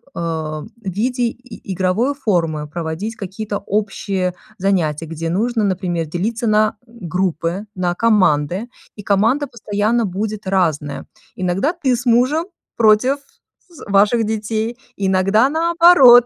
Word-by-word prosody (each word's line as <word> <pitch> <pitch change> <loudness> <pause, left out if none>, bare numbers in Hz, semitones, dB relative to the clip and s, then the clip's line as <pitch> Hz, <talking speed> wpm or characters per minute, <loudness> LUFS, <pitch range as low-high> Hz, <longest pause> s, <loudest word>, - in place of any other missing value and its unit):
а, 160 -2 -3
в - - -10 0.2
виде 240 +7 -1
и 235 -4 -5
игровой 190 +9 +1
формы 170 - -1
проводить 170 +7 -4
какие-то 205 +1 -5
общие 195 -3 -2 0.3
занятия, 165 -5 0
где 165 +1 -4
нужно, 220 +5 0
например, 180 -4 -1
делиться 220 - -2
на 215 0 +2
группы, 185 -3 -2
на 180 -1 -1
команды, 190 -2 +2 0.3
и 205 - -9
команда 225 +9 +2
постоянно 220 -1 0
будет 210 +2 -4
разная. 160 -7 0 0.3
Иногда 185 - 0
ты 275 -8 +1
с 245 +2 -6
мужем 255 +7 +3 0.3
против 230 +5 +4 0.5
з 340 - -13
ваших 205 +4 +4
детей, 220 +2 -2 0.2
иногда, 195 +5 +3
наоборот, 325 -6 +7
205 Hz, 120 wpm, -19 LUFS, 180-235 Hz, 0.5 s, наоборот